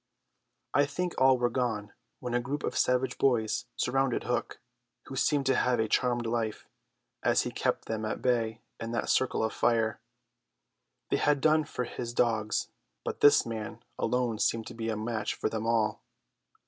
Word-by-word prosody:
I 145 -1 +4
think 180 +4 -2
all 130 0 +6
were 120 0 +1
gone 115 -5 -2 0.3
when 125 -1 -4
a 120 - +3
group 135 +4 -3
of - - -2
savage 125 +1 +1
boys 110 -5 +2
surrounded 135 0 +1
Hook, - - -2 0.5
who - - -8
seemed 145 -2 +2
to 135 -1 +3
have 125 -1 +2
a 110 - +2
charmed 120 +1 +1
life, 115 -2 -2 0.5
as - - +3
he - - -4
kept - - -1
them 110 -1 -3
at 110 - -2
bay 115 -3 0 0.2
in 115 +1 -4
that 115 - 0
circle 130 -3 +2
of 110 - -1
fire. 115 -2 +1 1.1
They - - +3
had 145 -1 +2
done 155 +1 +3
for 125 - -3
his 120 0 -5
dogs, 110 -3 +1 0.4
but - - -4
this 145 - +7
man 110 -2 -6 0.2
alone 125 -3 0
seemed 115 0 +1
to - - -9
be 115 0 -3
a 110 - -1
match 110 0 -2
for - - -1
them 110 0 -3
all. 110 -2 +1
120 Hz, 175 wpm, -29 LUFS, 110-130 Hz, 1.1 s, this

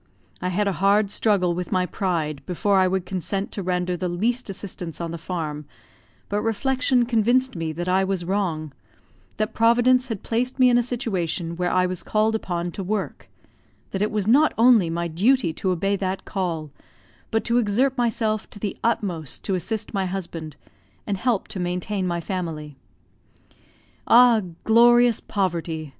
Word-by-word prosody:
I 180 - -1
had 200 +3 0
a - - +2
hard 200 +1 +3
struggle 195 -6 +2
with 180 0 -5
my 185 -1 +2
pride 160 -6 -2
before 195 +2 +2
I 185 - +4
would 185 -1 -1
consent 195 +2 -3
to 200 - -4
render 180 -1 -1
the 180 +1 -3
least 230 +7 -1
assistance 180 -4 -6
on 170 -1 -4
the 170 - -5
farm, 155 -4 -4 0.6
but 205 +1 -1
reflection 255 +2 +1
convinced 240 +2 +2
me 165 -2 -3
that 175 +3 -4
I 185 +1 +3
was 190 -2 -2
wrong 170 -6 -2 0.6
that 215 +1 -1
Providence 245 +3 +4
had 220 -4 -4
placed 250 +3 -1
me 255 -2 +5
in 240 - +4
a - - +3
situation 185 -8 -2
where 180 +1 -1
I 185 0 +2
was 185 -1 -3
called 215 +1 +1
upon 175 -5 -2
to 195 - -5
work 200 +1 -4 0.6
that 190 - -3
it 210 - +2
was 210 -2 -2
not 290 +7 +4
only 230 -6 +5
my 170 +1 -2
duty 195 +3 +2
to 190 - -2
obey 195 +3 +1
that 190 0 -3
call, 165 -6 -3 0.6
but 225 0 0
to 240 +1 +2
exert 245 +5 +1
myself 225 -3 0
to - - -13
the 205 0 -3
utmost 185 - -2
to 195 - -1
assist 215 +5 -2
my 195 -2 0
husband, 170 -5 -5 0.5
and 205 - -1
help 225 +1 0
to 190 - -5
maintain 180 +2 -2
my 170 -1 -1
family. 165 -5 -5 1.3
Ah, 240 -2 +6 0.2
glorious 240 +1 +5
poverty! 170 -5 -2
195 Hz, 170 wpm, -23 LUFS, 175-225 Hz, 1.3 s, Ah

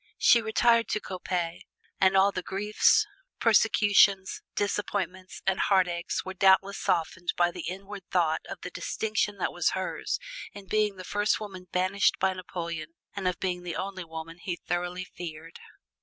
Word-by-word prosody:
She 235 - +6
retired 230 +1 +3
to 215 - 0
Coppet, 180 -3 -3 0.4
and 190 0 +4
all 195 +1 +5
the 185 - -3
griefs, 210 - +3 0.3
persecutions, 205 -3 +4
disappointments 195 -2 -2
and 190 0 +1
heartaches 180 -3 +1
were 190 - -5
doubtless 195 +1 +4
softened 175 +1 0
by 175 0 +3
the - - -7
inward 195 +1 -8
thought 165 -3 +2
of - - -7
the - - -6
distinction 215 -2 -1
that 185 - -1
was 175 -1 +2
hers 185 - -2 0.4
in 200 -1 -10
being 210 0 +1
the 185 - -9
first 205 +3 +1
woman 190 -4 -8
banished 185 +2 +2
by 190 0 +1
Napoleon 170 -3 -6 0.2
and 195 -2 -2
of 180 - -1
being 180 -2 -2
the 175 -1 -5
only 190 -1 -4
woman 165 +1 -8
he 180 0 -3
thoroughly 175 +2 -3
feared. 165 -2 -9
185 Hz, 155 wpm, -28 LUFS, 175-200 Hz, 0.4 s, She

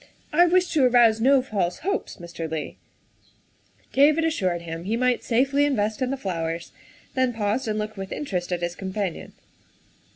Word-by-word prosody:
I 350 +3 +6
wish 360 +1 +2
to 300 -4 +3
arouse 235 -3 +5
no 265 +1 +4
false 195 -8 -1
hopes, 395 +4 -3
Mr. 170 -3 -7
Leigh." 155 -1 -5 1.1
David 300 +4 +4
assured 185 - -1
him 165 +1 -6
he 220 +4 0
might 250 0 +1
safely 270 +4 +2
invest 220 -7 0
in 255 - +1
the 275 - -2
flowers, 165 -6 -4 0.4
then 260 -2 +1
paused 225 +2 -1
and 215 -1 -1
looked 215 0 -4
with 195 0 -6
interest 185 -11 -3
at 175 -1 -2
his 175 0 -1
companion. 190 -2 -4
220 Hz, 165 wpm, -24 LUFS, 180-270 Hz, 1.1 s, I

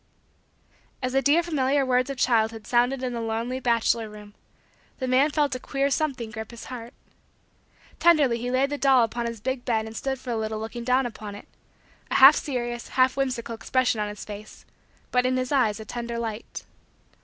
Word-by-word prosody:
As 255 0 -1
the 270 - +3
dear 300 +5 +4
familiar 280 -4 +1
words 255 0 +1
of 275 - -4
childhood 225 -3 +1
sounded 250 +2 +1
in 250 -1 -2
the 235 - -3
lonely 230 +3 -2
bachelor 235 -2 +1
room, 210 -1 -12 0.6
the 260 - -3
man 260 +4 +4
felt 290 -2 +1
a 255 - -3
queer 275 +2 -1
something 270 -7 -1
grip 220 -1 -7
his 235 -1 -10
heart. 235 -1 -8 1.0
Tenderly 290 -9 +4
he 245 +2 -3
laid 265 +2 +1
the 290 - -3
doll 265 -3 +5
upon 235 +1 -2
his 230 -1 -6
big 260 +3 -3
bed 220 -3 0
and 220 0 -9
stood 265 +2 -3
for 250 - -6
a 230 - -1
little 220 0 -3
looking 225 +2 -6
down 255 +2 +2
upon 215 -3 -7
it; 205 - -12 0.6
a - - -2
half 270 +3 +9
serious, 240 -4 -3
half 255 0 +2
whimsical, 255 -4 -2
expression 230 0 0
on 210 - -2
his 210 - -8
face 210 0 -10 0.5
but 250 0 +3
in 255 0 +1
his 255 +1 -2
eyes 225 -7 +2
a 220 - -8
tender 235 +1 -5
light. 225 -1 -5
245 Hz, 195 wpm, -25 LUFS, 225-265 Hz, 1.0 s, half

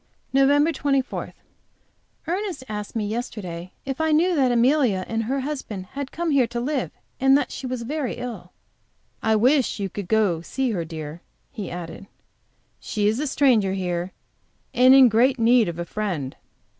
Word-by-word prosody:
NOVEMBER 285 +4 +4
24. 275 -3 -2 0.9
Ernest 355 -4 -3
asked 210 0 -6
me 220 -2 -1
yesterday 195 -6 -5
if 270 +2 -3
I 320 0 +2
knew 340 +4 +3
that 265 -4 +3
Amelia 240 -5 +2
and 225 0 -1
her 270 +4 -1
husband 260 -9 -5
had 280 -1 -5
come 340 -1 -2
here 265 -4 +3
to 235 +1 -4
live, 270 +1 -1 0.3
and 270 +1 +5
that - - -2
she 260 - -5
was 250 -2 -4
very 280 0 -3
ill. 225 -8 -7 0.7
"I 220 0 +2
wish 255 +2 +2
you 195 -2 -3
would 200 -3 -4
go 205 -5 +2
to - - -12
see 265 +6 -1
her, 180 -6 -2
dear," 160 0 -7 0.3
he 210 -9 -6
added. 175 +3 -7 0.7
"She 205 -1 -1
is 220 +4 +1
a 300 - -1
stranger 240 -9 +3
here, 180 -1 -2 0.6
and 255 +2 +7
in 265 -2 +8
great 245 +4 +3
need 230 -3 +4
of 170 - -6
a 170 - -3
friend." 170 -10 -3
240 Hz, 170 wpm, -23 LUFS, 195-275 Hz, 0.9 s, in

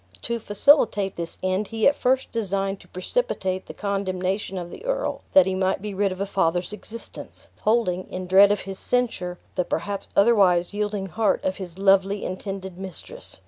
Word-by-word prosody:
To 235 0 -2
facilitate 210 -3 +3
this 170 -1 -5
end 185 +2 0
he 225 0 +2
at 285 - +4
first 260 +1 +1
designed 195 -3 -1
to - - -17
precipitate 185 - -2
the - - -7
condemnation 195 -1 -2
of 175 -1 -5
the - - -10
earl, - - -2
that 285 - +8
he 190 - -1
might 185 0 0
be 205 +1 -5
rid 195 0 +1
of 185 - -6
a 200 - 0
father's 180 -1 0
existence, 225 +2 -10
holding, 210 -5 +1
in 185 0 -5
dread 195 +2 +6
of 205 - 0
his 195 0 -7
censure, 210 -8 -1 0.2
the 180 - 0
perhaps 200 +2 -3
otherwise 200 -5 +4
yielding 205 -1 -2
heart 215 +3 0
of 190 0 0
his 185 -2 -8
lovely 195 +1 +3
intended 190 -1 -5
mistress. 195 - -8
195 Hz, 180 wpm, -24 LUFS, 185-210 Hz, 0.2 s, that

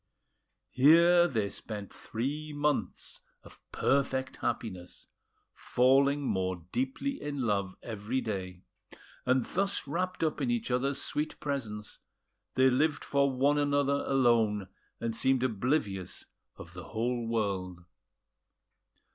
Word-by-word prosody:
Here 170 +6 +6
they 110 -9 0
spent 105 -1 -6
three 145 +7 -4
months 145 0 -1 0.2
of - - -16
perfect 130 -1 0
happiness, 95 -6 -4 0.5
falling 140 +3 +3
more 95 -7 -1
deeply 135 - -2
in 145 -3 -3
love 100 -4 0
every 110 +3 -3
day; 95 -6 -5 0.6
and 130 -1 +3
thus 195 +1 -1
wrapped 180 +5 -2
up 155 -2 0
in 130 - 0
each 120 +1 -1
other's 135 +3 0
sweet 150 +2 -2
presence, 110 -8 -4 0.6
they 130 0 +5
lived 145 +3 +1
for 140 -1 +2
one 140 +3 +2
another 145 -1 +1
alone, 115 -7 +2 0.3
and 115 -1 -2
seemed 130 +1 +2
oblivious 105 - -1 0.3
of 85 - -11
the 90 -1 -8
whole 120 +1 -2
world. 95 -6 -2
130 Hz, 115 wpm, -30 LUFS, 105-145 Hz, 0.6 s, Here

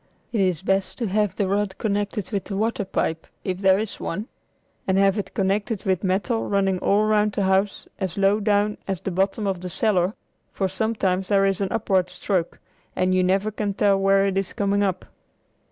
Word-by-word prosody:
It 225 -4 +1
is 185 -3 +1
best 195 0 0
to 240 - -2
have 210 0 +1
the 200 - 0
rod 200 0 -1
connected 205 -1 -2
with 200 -3 -2
the 195 - -4
water 220 -1 0
pipe, 165 -3 -2 0.2
if 185 -1 -3
there 190 -1 +4
is 215 0 -4
one, 205 +7 -4 0.6
and 190 0 +2
have 195 +1 +3
it 205 - -6
connected 205 +2 0
with 190 -1 +1
metal 200 +5 0
running 195 -2 +1
all 200 +3 +3
around 215 -1 +2
the 200 - 0
house 190 +1 +1
as 190 -2 -3
low 200 +2 +3
down 210 0 +1
as 190 -4 -2
the 195 - -3
bottom 195 +4 0
of 190 -3 -1
the 180 - -5
cellar, 190 0 +1 0.4
for 195 - -1
sometimes 190 -2 -1
there 195 -1 +3
is 195 0 0
an 195 - +1
upward 190 -5 +1
stroke, 180 -1 -2 0.4
and 185 0 +1
you 185 0 +3
never 195 +3 +1
can 205 -1 -3
tell 200 -1 +3
where 195 0 +4
it 195 -1 +1
is 195 - -4
coming 200 0 +1
up. 190 -2 -1
195 Hz, 200 wpm, -23 LUFS, 190-205 Hz, 0.6 s, there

